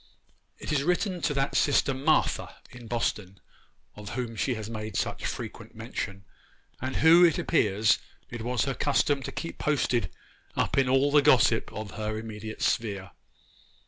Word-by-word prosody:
It - - -6
is 145 -2 +2
written 180 +3 0
to 150 - 0
that 135 0 0
sister 145 -1 +3
'Martha' 145 +4 +1 0.2
in 125 -2 -11
Boston, 105 -5 -2 0.6
of 105 +1 -8
whom 120 -2 -3
she 125 +3 0
made 110 -1 -5
such - - -2
frequent - - -7
mention, 100 0 -6 0.6
and 130 +1 -3
who, 165 +2 +7
it 170 -2 +5
appears, 110 - +2 0.3
it 120 -2 -6
was 125 +2 0
her 135 - -1
custom 145 +1 +1
to 135 - -5
keep 135 +5 -6
posted 125 - 0 0.5
up - - 0
in 135 -2 +3
all 135 +2 +3
the 145 0 +6
gossip - - +4
of 110 -1 -6
her 110 0 -4
immediate 110 0 -6
sphere. 100 -4 -1
125 Hz, 155 wpm, -27 LUFS, 110-145 Hz, 0.6 s, who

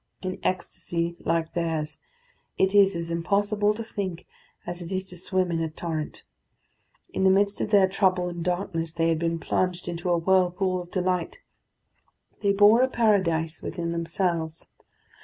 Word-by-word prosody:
In 185 0 -4
ecstasy 170 -2 -2
like 165 -1 -1
theirs 160 -3 -2 0.6
it 190 +1 +2
is 200 -2 +5
as 170 0 -3
impossible 205 +5 +1
to 230 - -5
think 190 -6 -5 0.4
as 175 0 -5
it 170 +1 -7
is 190 0 -2
to 185 -1 -11
swim 185 0 -1
in 165 -1 0
a 160 - -1
torrent. 155 -1 -5 0.9
In - - 0
the 190 - +6
midst 200 +1 +2
of - - -1
their 200 -3 +5
trouble 185 -2 +1
and 175 -1 -5
darkness 175 -2 -2
they 165 0 +1
had 165 -1 +1
been 165 0 0
plunged 180 +1 -1
in 170 -1 -3
a 175 -1 +2
whirlpool 185 +1 +2
of 175 - -11
delight; 180 -2 -1 1.0
they 200 - +3
bore 205 +4 +6
a 260 - +4
paradise 185 -10 +1
within 170 -1 -3
themselves. 170 -1 -2
180 Hz, 160 wpm, -26 LUFS, 170-190 Hz, 1.0 s, the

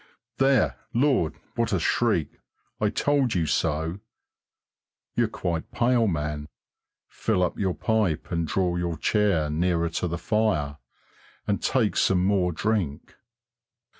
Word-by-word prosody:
There! 135 -3 +3 0.2
Lord, 125 - +2 0.2
what 115 -1 0
a 95 - +1
shriek! 85 - 0 0.4
I 105 - +2
told 140 -1 +1
you 85 -2 +1
so! 80 +4 -1 1.2
You're - - +2
quite 85 -3 -3
pale, 120 -1 +2
man. 75 -4 -2 0.6
Fill 90 - 0
up 90 - -2
your 95 -3 0
pipe 105 -9 0
and 85 -2 -1
draw 90 +2 0
your 85 -2 -2
chair 100 -3 +2
nearer 85 +1 +1
to 85 +2 -2
the 85 0 -3
fire, 85 -11 0 0.7
and 100 - -1
take 120 -6 +1
some 90 -1 +3
more 95 -3 +2
drink. 90 -5 -2
90 Hz, 130 wpm, -26 LUFS, 80-110 Hz, 1.2 s, There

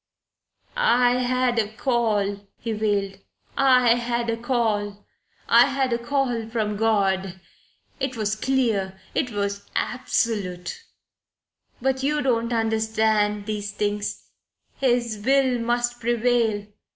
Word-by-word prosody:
"I 250 - +3
had 255 -1 +1
a 215 - +1
call," 215 -5 0
he 230 - -4
wailed. 205 -2 -1 0.4
"I 250 -3 +5
had 235 -1 -1
a 230 - -2
call. 215 -4 -1 0.4
I 235 +2 +6
had 270 -2 0
a 235 - 0
call 240 -3 -1
from 215 -2 -1
God. 195 -4 +1 0.6
It 260 -2 -2
was 215 -1 0
clear. 215 -6 0
It 255 - 0
was 200 -2 -3
absolute. 220 - -2 1.0
But 265 0 +1
you 295 +2 0
don't 235 -2 +1
understand 220 -2 +1
these 205 -1 -4
things. 205 0 -2 0.6
His 240 -5 +1
will 265 -1 +3
must 240 +1 -1
prevail. 235 -3 +1
230 Hz, 115 wpm, -24 LUFS, 210-245 Hz, 1.0 s, I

